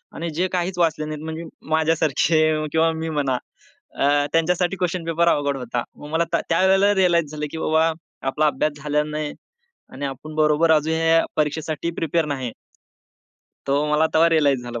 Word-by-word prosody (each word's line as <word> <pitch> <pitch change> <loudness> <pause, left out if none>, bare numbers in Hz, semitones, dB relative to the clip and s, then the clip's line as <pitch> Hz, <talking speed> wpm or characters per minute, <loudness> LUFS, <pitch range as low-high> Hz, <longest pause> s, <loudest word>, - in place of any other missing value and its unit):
आणि 170 +1 -4
जे 180 +4 0
काहीच 180 0 -1
वाचले 160 -2 +1
नाहीत 155 0 -6
म्हणजे 160 +1 -5 0.3
माझ्यासारखे 160 0 +2 0.3
किंवा 160 +1 +3
मी 160 0 -4
म्हणा. 140 -4 0 0.6
अ, - - 0 0.3
त्यांच्यासाठी 175 +3 +1
क्वेशन 180 -1 -2
पेपर 165 +1 +1
अवघड 145 -4 +1
होता. 120 -1 -3
मग 145 - -11
मला 160 +2 +1
त्या - - +2
त्यावेळेला 190 +4 +4
रिअलाइज 170 -5 +2
झालं, 150 -1 -4
की - - -6
बाबा 160 +1 +2 0.4
आपला 150 +3 +2
अभ्यास 150 +2 0
झालेला 150 0 +1
नाही 150 -1 -3 0.6
आणि 140 +2 -5
आपण 140 +3 -7
बरोबर 155 +1 +3
अजून 155 0 +2
या 165 0 +3
परीक्षेसाठी 155 +1 -1
प्रिपेअर 165 0 0
नाही. 130 -5 -3 1.2
तो 140 +2 +1
मला 150 +1 +3
तेव्हा 165 +1 +5
रिअलाइज 145 -6 +2
झालं 120 -1 -6
160 Hz, 165 wpm, -22 LUFS, 150-165 Hz, 1.2 s, तेव्हा